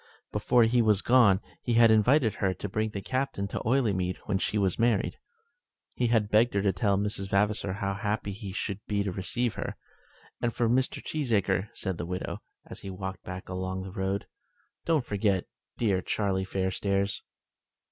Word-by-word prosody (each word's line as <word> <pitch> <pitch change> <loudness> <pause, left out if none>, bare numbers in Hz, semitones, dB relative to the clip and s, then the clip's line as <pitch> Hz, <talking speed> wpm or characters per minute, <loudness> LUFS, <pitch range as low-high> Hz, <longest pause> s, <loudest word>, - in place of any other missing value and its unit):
Before 110 +3 +3
he 120 +2 +3
was 105 -3 +3
gone 115 -6 +5 0.2
he 120 - -1
had 115 -1 +6
invited 110 +2 +4
her 95 -1 +1
to - - -5
bring 110 +2 -1
the 100 -2 -6
Captain 130 -6 -1
to - - -3
Oileymead 105 -8 +1
when 95 - 0
she 105 - 0
was 95 -1 +1
married, 115 -2 +1 0.8
and 120 -2 +2
had 110 -3 +2
begged 110 +1 +4
her 100 - +3
to 100 -2 +2
tell 100 +2 +1
Miss 105 +1 0
Vavasor 100 0 +1
how 100 0 -2
happy 105 +1 -2
he 100 0 -7
should 100 0 -3
be 100 -1 0
to 100 - -2
receive 105 +5 -1
her. - - -5 0.6
"And 120 - +1
Mr. 125 +2 +1
Cheesacre," 110 - 0
said 95 -3 -3
the 85 - -3
widow, 90 +1 -4 0.3
as - - -8
he 100 - -7
walked 95 0 -5
back 90 0 -7
along 95 0 -3
the 95 - -7
road, 95 +1 -2 0.6
"don't 155 -6 +2
forget 100 -3 +1 0.3
dear 100 -5 +1
Charlie 95 -1 -1
Fairstairs." 100 +1 -1
100 Hz, 175 wpm, -28 LUFS, 95-115 Hz, 0.8 s, had